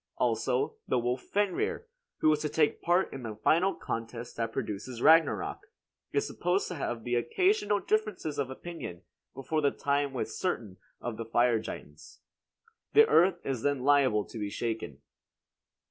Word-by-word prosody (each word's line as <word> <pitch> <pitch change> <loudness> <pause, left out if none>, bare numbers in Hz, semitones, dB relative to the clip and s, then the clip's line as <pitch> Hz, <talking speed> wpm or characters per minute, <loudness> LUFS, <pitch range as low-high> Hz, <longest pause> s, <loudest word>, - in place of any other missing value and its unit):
Also, 440 +1 0
the - - +2
wolf 125 +1 -1
Fenrir, 205 - -1 0.4
who 155 - +5
is 150 - 0
to 150 - -2
take 150 -1 +1
part 175 +2 +2
in 135 - -6
the 110 -3 -6
final 170 - +2
contest 115 +1 -5
that 115 -1 -2
produces 110 +3 -4
Ragnarok, 155 - +4 0.5
is 140 - +1
supposed 180 +3 0
to - - -4
have 120 -6 -4
occasional 205 - +2
differences 195 -7 -1
of 135 -2 -1
opinion 130 - -7 0.3
before 155 +4 -1
the 145 - +4
time 140 0 0
with 130 - -3
certain 115 - -3 0.2
of 120 -3 -5
the 115 - -4
fire 120 0 +3
giants. 110 - -10 0.7
The 445 - +8
earth 175 - +4
is 130 -4 -2
then 140 -1 0
liable 135 -7 +4
to 115 - -9
be 105 -1 -2
shaken. 115 +2 -4
140 Hz, 155 wpm, -30 LUFS, 115-175 Hz, 0.7 s, The